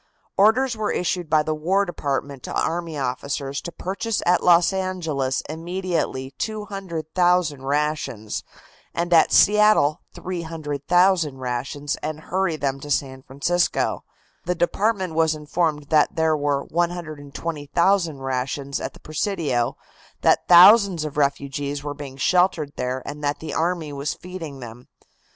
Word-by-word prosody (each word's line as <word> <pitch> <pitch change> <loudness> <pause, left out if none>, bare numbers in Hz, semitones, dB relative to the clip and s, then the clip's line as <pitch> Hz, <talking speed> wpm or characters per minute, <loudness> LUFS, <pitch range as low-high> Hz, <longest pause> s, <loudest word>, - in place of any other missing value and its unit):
Orders 230 +5 +4
were 215 -1 -1
issued 175 -1 -2
by 155 -1 +4
the 155 - -1
War 185 +6 +1
Department 140 -5 -3
to - - -7
army 165 -2 -2
officers 140 +1 -3
to 170 - -7
purchase 200 +6 -3
at 180 +1 +3
Los 175 +1 +5
Angeles 165 -9 -1
immediately 165 -5 -3
200,000 180 -6 -1
rations 140 -6 -2 0.5
and 175 +1 0
at 165 - +5
Seattle 210 -7 +5
300,000 165 -1 0
rations 130 +3 -3
and 155 0 -4
hurry 185 -1 -1
them 135 -2 -2
to 145 - -9
San 130 -2 -1
Francisco. 155 +7 0 0.4
The 180 +1 0
department 190 +1 0
was 160 -1 +2
informed 150 -1 -2
that 155 +5 +3
there 160 -1 +2
were 145 -1 0
120,000 165 +1 -1
rations 135 +2 -3
at - - -4
the - - -15
Presidio, 155 - -1 0.4
that - - +3
thousands 185 -1 +7
of 150 - -6
refugees 140 0 -1
were 145 0 -4
being 140 -2 -9
sheltered 175 -1 +2
there 125 +1 -3
and 150 +1 -7
that 145 0 0
the 160 - -6
army 165 -2 -1
was 140 +1 -3
feeding 165 -7 -8
them. 120 +1 -10
155 Hz, 135 wpm, -23 LUFS, 140-180 Hz, 0.5 s, thousands